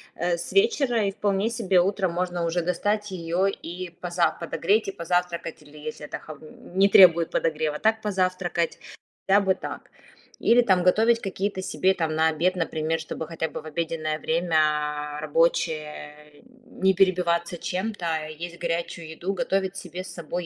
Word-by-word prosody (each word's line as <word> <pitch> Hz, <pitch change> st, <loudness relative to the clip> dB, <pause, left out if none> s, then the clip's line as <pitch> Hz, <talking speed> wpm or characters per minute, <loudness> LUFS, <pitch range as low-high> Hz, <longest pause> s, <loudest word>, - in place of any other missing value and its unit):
э, 175 Hz, 0 st, 0 dB
с -, -, -6 dB
вечера, 280 Hz, -, +3 dB
и 195 Hz, -, 0 dB
вполне 205 Hz, +1 st, 0 dB
себе 195 Hz, -6 st, +2 dB
утром 190 Hz, -1 st, 0 dB
можно 175 Hz, -1 st, -1 dB
уже 170 Hz, +1 st, 0 dB
достать 205 Hz, +4 st, -1 dB
её 175 Hz, +2 st, 0 dB
и 180 Hz, -1 st, -5 dB
поза 175 Hz, 0 st, 0 dB
подогреть, 195 Hz, +6 st, +1 dB
и -, -, -2 dB
позавтракать, 170 Hz, -2 st, -2 dB
или 150 Hz, +1 st, -16 dB
если 150 Hz, 0 st, -7 dB
это -, -, -6 dB
холо 155 Hz, -2 st, -11 dB, 0.4 s
не 195 Hz, +1 st, +6 dB
требует 170 Hz, -4 st, +7 dB
подогрева, 155 Hz, -2 st, -1 dB
так 220 Hz, 0 st, +2 dB
позавтракать. 185 Hz, -4 st, -1 dB, 0.5 s
Хотя 200 Hz, +1 st, +5 dB
бы 190 Hz, -1 st, +2 dB
так. -, -, -8 dB, 0.5 s
Или, 240 Hz, +1 st, +5 dB
там, 190 Hz, -5 st, +3 dB
готовить 225 Hz, +6 st, +4 dB
какие-то 195 Hz, 0 st, -3 dB
себе, 190 Hz, 0 st, +1 dB
там, 160 Hz, -3 st, -2 dB
на 160 Hz, 0 st, +4 dB
обед, 175 Hz, +4 st, +1 dB
например, 160 Hz, -1 st, -1 dB
чтобы 160 Hz, 0 st, -6 dB
хотя 160 Hz, 0 st, -3 dB
бы -, -, -7 dB
в -, -, -18 dB
обеденное 155 Hz, -1 st, -2 dB
время 150 Hz, -3 st, 0 dB
рабочее 150 Hz, -1 st, -1 dB, 0.4 s
не 190 Hz, 0 st, +5 dB
перебиваться 175 Hz, -2 st, +2 dB
чем-то, 185 Hz, +1 st, -3 dB, 0.2 s
есть 170 Hz, +2 st, -7 dB
горячую 170 Hz, -1 st, -3 dB
еду. 175 Hz, +4 st, -3 dB
Готовить 195 Hz, -3 st, -1 dB
себе 185 Hz, -1 st, -7 dB
с -, -, -9 dB
собой. 175 Hz, +1 st, -5 dB
175 Hz, 160 wpm, -25 LUFS, 160-195 Hz, 0.5 s, требует